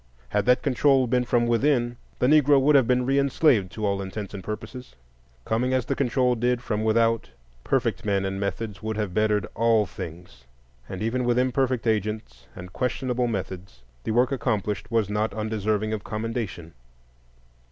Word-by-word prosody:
Had 105 Hz, +1 st, 0 dB
that 125 Hz, 0 st, +4 dB
control 135 Hz, 0 st, +3 dB
been 125 Hz, +1 st, +1 dB
from 120 Hz, 0 st, +2 dB
within, 120 Hz, 0 st, +1 dB, 0.2 s
the -, -, +1 dB
Negro 145 Hz, 0 st, +5 dB
would 145 Hz, +3 st, +4 dB
have 135 Hz, -5 st, +5 dB
been 125 Hz, 0 st, +2 dB
re 135 Hz, +2 st, +2 dB
enslaved, 135 Hz, -, +2 dB
to 110 Hz, -, -3 dB
all 100 Hz, -1 st, 0 dB
intents 100 Hz, +1 st, -6 dB
and 95 Hz, -2 st, -7 dB
purposes. 110 Hz, +5 st, -7 dB, 0.5 s
Coming 125 Hz, +4 st, 0 dB
as 130 Hz, -2 st, 0 dB
the -, -, -1 dB
control 125 Hz, -1 st, +1 dB
did 120 Hz, +1 st, 0 dB
from 110 Hz, -2 st, -2 dB
without, 115 Hz, +1 st, +2 dB, 0.3 s
perfect -, -, 0 dB
men 100 Hz, -2 st, 0 dB
and 95 Hz, 0 st, -3 dB
methods 100 Hz, 0 st, -4 dB
would 110 Hz, 0 st, -3 dB
have 105 Hz, -4 st, -2 dB
bettered 105 Hz, 0 st, +1 dB
all 115 Hz, -1 st, +3 dB
things; 80 Hz, -8 st, -10 dB, 0.4 s
and 95 Hz, +2 st, -5 dB
even 125 Hz, +3 st, 0 dB
with 120 Hz, 0 st, +1 dB
imperfect 130 Hz, -1 st, +1 dB
agents 105 Hz, -, -2 dB
and 90 Hz, +1 st, -10 dB
questionable 125 Hz, -1 st, -1 dB
methods, 95 Hz, -, -6 dB, 0.2 s
the -, -, -4 dB
work 120 Hz, +4 st, +2 dB
accomplished 110 Hz, -5 st, -2 dB
was 115 Hz, -3 st, +1 dB
not 105 Hz, 0 st, -1 dB
undeserving 110 Hz, 0 st, -1 dB
of 105 Hz, -1 st, -4 dB
commendation. 110 Hz, -7 st, -4 dB
110 Hz, 170 wpm, -25 LUFS, 105-125 Hz, 0.5 s, Negro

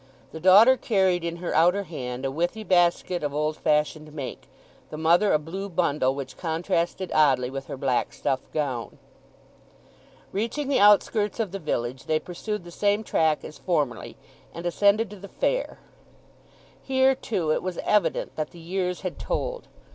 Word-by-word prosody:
The 160 Hz, -, -7 dB
daughter 205 Hz, +9 st, +7 dB
carried 190 Hz, -6 st, +1 dB
in 170 Hz, 0 st, -3 dB
her 175 Hz, +1 st, -4 dB
outer 175 Hz, +5 st, +3 dB
hand 130 Hz, -7 st, -6 dB
a 135 Hz, -, -1 dB
withy 175 Hz, +9 st, -2 dB
basket 175 Hz, -1 st, +2 dB
of 145 Hz, -1 st, -3 dB
old 150 Hz, +1 st, 0 dB
fashioned 150 Hz, 0 st, 0 dB
make; 145 Hz, -4 st, -7 dB, 0.4 s
the 155 Hz, -, -7 dB
mother 170 Hz, +6 st, +3 dB
a -, -, +5 dB
blue 185 Hz, +6 st, -6 dB
bundle, 150 Hz, -7 st, +1 dB
which 135 Hz, -2 st, -7 dB
contrasted 175 Hz, +2 st, -2 dB
oddly 130 Hz, -5 st, +3 dB
with 135 Hz, 0 st, -6 dB
her -, -, -6 dB
black 130 Hz, -2 st, 0 dB
stuff 130 Hz, -, -1 dB
gown. 130 Hz, -6 st, -3 dB, 1.3 s
Reaching 235 Hz, +8 st, -2 dB
the 280 Hz, -, +2 dB
outskirts 210 Hz, +1 st, +4 dB
of 215 Hz, -5 st, -1 dB
the 195 Hz, -, -5 dB
village 130 Hz, -5 st, -3 dB
they 155 Hz, -, +1 dB
pursued 185 Hz, +5 st, -5 dB
the 175 Hz, -, -11 dB
same 205 Hz, +4 st, +1 dB
track 160 Hz, -6 st, +1 dB
as -, -, -10 dB
formerly, 145 Hz, -10 st, -2 dB, 0.4 s
and 170 Hz, -, -7 dB
ascended 200 Hz, +4 st, +2 dB
to 205 Hz, -, -9 dB
the 200 Hz, +1 st, -10 dB
fair. -, -, -1 dB, 1.0 s
Here, 265 Hz, 0 st, +3 dB
too 195 Hz, -11 st, -2 dB
it -, -, +1 dB
was 185 Hz, -1 st, -4 dB
evident 210 Hz, -1 st, +1 dB
that 155 Hz, -1 st, -2 dB
the 175 Hz, -, -14 dB
years 180 Hz, +1 st, -3 dB
had 185 Hz, -2 st, -5 dB
told. -, -, -3 dB
175 Hz, 165 wpm, -25 LUFS, 150-200 Hz, 1.3 s, daughter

